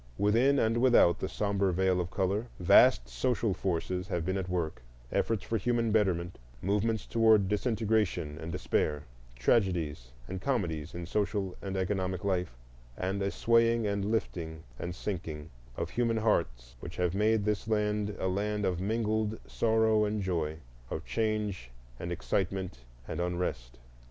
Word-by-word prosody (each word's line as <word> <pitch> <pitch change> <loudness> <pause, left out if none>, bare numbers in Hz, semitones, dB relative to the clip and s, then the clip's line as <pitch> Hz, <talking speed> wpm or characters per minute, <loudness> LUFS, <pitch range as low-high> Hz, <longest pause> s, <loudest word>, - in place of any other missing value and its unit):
Within 120 +7 +3
and 115 -2 +2
without 120 -9 +5
the - - -3
sombre 100 -2 0
veil 90 0 +2
of 90 - -4
color 100 +5 -1
vast 80 -7 +6
social 110 - 0
forces 90 0 -2
have 85 -5 -2
been 95 +1 0
at 95 -1 -3
work,—efforts 80 - -2
for 115 - -1
human 115 +1 +1
betterment, 90 -5 +1 0.2
movements 105 +3 0
toward 110 -4 +4
disintegration 105 - 0
and 80 +1 -5
despair, 75 -4 0 0.3
tragedies 80 - +1 0.2
and 95 0 -5
comedies 90 - -2
in 85 0 -5
social 100 0 -1
and 95 -1 -4
economic 95 0 -1
life, 90 -10 -1 0.4
and 95 +2 -2
a 100 - +1
swaying 115 +1 +3
and 100 -1 0
lifting 85 -7 -2 0.2
and 90 +1 -4
sinking 80 -6 -5 0.3
of - - -3
human 115 -2 +1
hearts 65 - 0
which - - -8
have 90 -1 +1
made 105 +1 +2
this 105 0 -1
land 105 -1 0
a 95 - -1
land 105 +2 -1
of 90 -1 0
mingled 110 +1 0
sorrow 110 -1 +2
and 105 -1 -1
joy, 80 -4 -1 0.3
of - - -5
change 105 - -1 0.3
and 85 - -4
excitement 95 -3 -2 0.3
and - - -4
unrest. 85 -9 -3
95 Hz, 145 wpm, -30 LUFS, 85-110 Hz, 0.4 s, vast